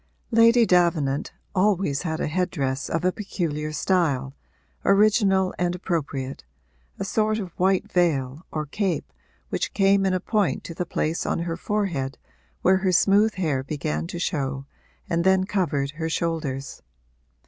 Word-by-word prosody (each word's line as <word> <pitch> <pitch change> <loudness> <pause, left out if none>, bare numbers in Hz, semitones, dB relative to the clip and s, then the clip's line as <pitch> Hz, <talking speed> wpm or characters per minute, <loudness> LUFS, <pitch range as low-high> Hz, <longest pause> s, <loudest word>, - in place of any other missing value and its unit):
Lady 230 +1 +6
Davenant 170 -7 +2 0.2
always 190 -7 +1
had 160 -3 -3
a - - 0
head 180 +4 0
dress 135 -2 -2
of 165 +2 -1
a 185 - +4
peculiar 160 -7 -3
style, 150 -6 0 0.5
original 195 -2 +3
and 175 0 0
appropriate 145 -7 -3 0.5
a 195 - -3
sort 215 +1 +1
of 190 -5 -5
white 190 +2 +1
veil 150 -4 +1
or 155 -1 -2
cape 190 +5 -2 0.4
which - - -2
came 195 0 +4
in 185 - +1
a - - 0
point 210 +1 0
to 170 - -7
the 175 +1 -4
place 160 0 -1
on - - -1
her 170 0 -2
forehead 175 -9 -2 0.5
where 190 +1 +5
her 190 -1 +1
smooth 205 +4 +4
hair 150 -8 0
began 85 - -3
to - - -6
show 140 -6 -2 0.4
and 170 0 0
then 190 0 +4
covered 165 -8 -1
her 160 +2 -4
shoulders. 160 -5 -3
175 Hz, 150 wpm, -24 LUFS, 145-195 Hz, 0.5 s, Lady